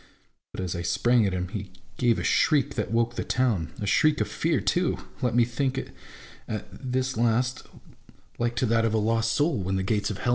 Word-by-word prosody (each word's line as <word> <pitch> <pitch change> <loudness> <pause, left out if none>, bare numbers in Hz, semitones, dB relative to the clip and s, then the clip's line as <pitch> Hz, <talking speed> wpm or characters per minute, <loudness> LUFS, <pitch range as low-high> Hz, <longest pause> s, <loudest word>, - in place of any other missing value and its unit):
But - - -6
as 90 -1 -3
I 85 - -3
sprang 110 +6 +2
at 95 - -2
him, 90 -1 -2
he 100 -1 -5 0.3
gave 120 -2 +3
a - - -3
shriek 140 -2 +2
that 105 -5 -2
woke 115 +1 +1
the - - -3
town; 105 - 0
a 105 - -3
shriek 150 - +3
of 105 - 0
fear 155 +10 0
too, 175 0 +1 0.2
let 125 -3 0
me 120 -1 +5
think 130 +2 -1
it - - -4 0.6
at 110 - -4
this 130 -1 -2
last, 120 +2 +1 0.7
like 120 0 0
to 125 - +1
that 115 -1 +2
of 110 -1 +1
a - - +3
lost 115 +2 +1
MY 145 - +5
ENEMY 95 - -1
AND 95 - -4
MYSELF. 105 -2 0
115 Hz, 210 wpm, -26 LUFS, 105-125 Hz, 0.7 s, me